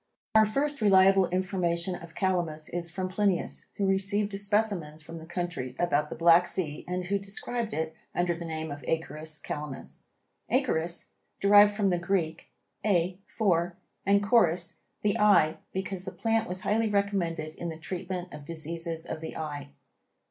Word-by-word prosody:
Our 220 -1 +6
first 280 +4 -1
reliable 195 -2 +6
information 180 -1 0
of 170 -2 -9
Calamus 170 -5 -1
is 170 -1 -3
from 185 +3 -3
Plinius, 190 -1 0
who 200 - 0
received 200 +2 +1
specimens 200 -7 0
from 165 +2 -8
the 160 - -11
country 170 -8 -3
about 150 -4 +1
the - - -5
Black 170 +2 +6
Sea 155 -5 -3
and 180 0 -2
who 200 +3 0
described 215 +3 -3
it 160 -2 -2 0.2
under 175 0 +2
the 170 0 -6
name 160 -1 -4
of 145 -1 -7
Acorus 160 -1 -2
calamus. 150 -3 -6 0.4
Acorus, 170 +2 0 0.3
derived 205 +1 +7
from 205 -2 +2
the 175 - +1
Greek 175 -2 -1 0.3
a 180 -3 +1
for, 175 -5 +1 0.3
and 200 +1 +3
corus, 180 -6 +3 0.3
the 210 +2 +1
eye, 205 -7 +5
because 190 -1 -3
the 190 - -5
plant 225 -2 0
was 185 +1 -3
highly 215 +2 +1
recommended 185 -6 0
in 170 - -5
the 160 - -6
treatment 180 +1 -5
of 150 - -8
diseases 165 +1 -4
of 160 - -5
the 160 - -6
eye. 145 -2 -5
180 Hz, 160 wpm, -29 LUFS, 165-200 Hz, 0.4 s, derived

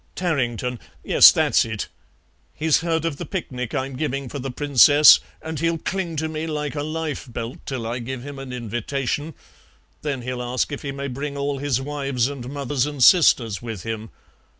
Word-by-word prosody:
Tarrington 125 - -1 0.2
yes, - - +8
that's - - +3
it. 110 -2 -4 0.7
He's 155 0 +2
heard 165 -1 -1
of 155 -4 -2
the - - -5
picnic 125 - -4
I'm 135 -1 -2
giving 135 -2 -3
for 145 - -6
the 135 +1 -4
Princess, 145 +2 +7 0.2
and 160 -2 -5
he'll 165 +1 +1
cling 180 0 -3
to 160 +1 -1
me 155 +1 -4
like 150 -2 -3
a 145 - -3
lifebelt 145 -6 -5
till 130 -4 -3
I 120 +2 -3
give 125 +1 -6
him 140 0 -8
an 135 -1 -7
invitation; 125 +6 -3 0.7
then 140 -4 -3
he'll 125 0 -4
ask 125 +3 -1
if 145 - -5
he 140 - -4
may 140 0 -5
bring 140 +2 -5
all 140 0 -2
his 140 -3 0
wives 135 -3 -1
and 130 -3 -7
mothers 140 -1 -1
and 145 -3 -1
sisters 120 - +5
with 115 -6 -6
him. 110 -1 -5
140 Hz, 180 wpm, -23 LUFS, 125-150 Hz, 0.7 s, yes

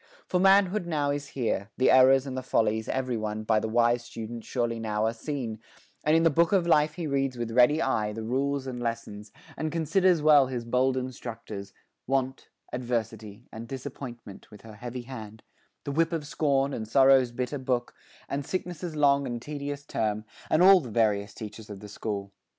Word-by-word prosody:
For 180 - 0
manhood 195 0 +4
now 145 -4 0
Is 145 0 -3
here 110 -4 -1
the 130 - +4
errors 130 +1 +6
and 135 -2 -5
the 130 - -2
follies, 110 -3 0
everyone, 110 -5 -2
By 110 0 +2
the 110 - -3
wise 120 +1 +3
student 115 0 -7
surely 120 -2 -2
now 110 -1 -1
are 110 - 0
seen, 120 -3 -5 0.4
And 155 +1 +3
in 165 - +2
the 165 - +4
book 165 +3 +3
of 190 -4 +3
life 155 -2 +3
he 175 -2 -4
reads 135 -3 -1
with 120 -1 -3
ready 125 +7 +4
eye 105 -5 0
The 110 +1 -6
rules 135 +4 -1
and 125 -2 -5
lessons, 105 -3 -5 0.2
and 155 -1 -3
considers 170 +2 +2
well 145 -3 +6
His 125 -2 -4
bold 130 +2 +1
instructors, 115 -5 -6 0.4
Want, 130 0 -1 0.2
Adversity, 115 -3 -4
And 115 +1 -8
Disappointment, 125 -5 -8
with 105 - -14
her 110 -1 -12
heavy 120 +3 -7
hand; 110 -4 -9 0.4
The 140 - -4
whip 165 +3 +1
of 160 -3 -2
Scorn, 140 -1 0
and 110 -3 -4
Sorrow's 130 0 +5
bitter 125 +3 -3
book, 125 -2 -1 0.3
And 140 +1 -3
Sickness' 175 0 -4
long 140 -2 +3
and 120 -1 -4
tedious 145 +1 -6
term, 110 -4 -2 0.2
And 155 +3 +4
all 190 0 +8
the 130 -8 -8
various 105 -3 +1
teachers 110 0 -9
of 100 -2 -8
the 105 - -10
school. 100 -1 -5
130 Hz, 185 wpm, -27 LUFS, 110-145 Hz, 0.4 s, all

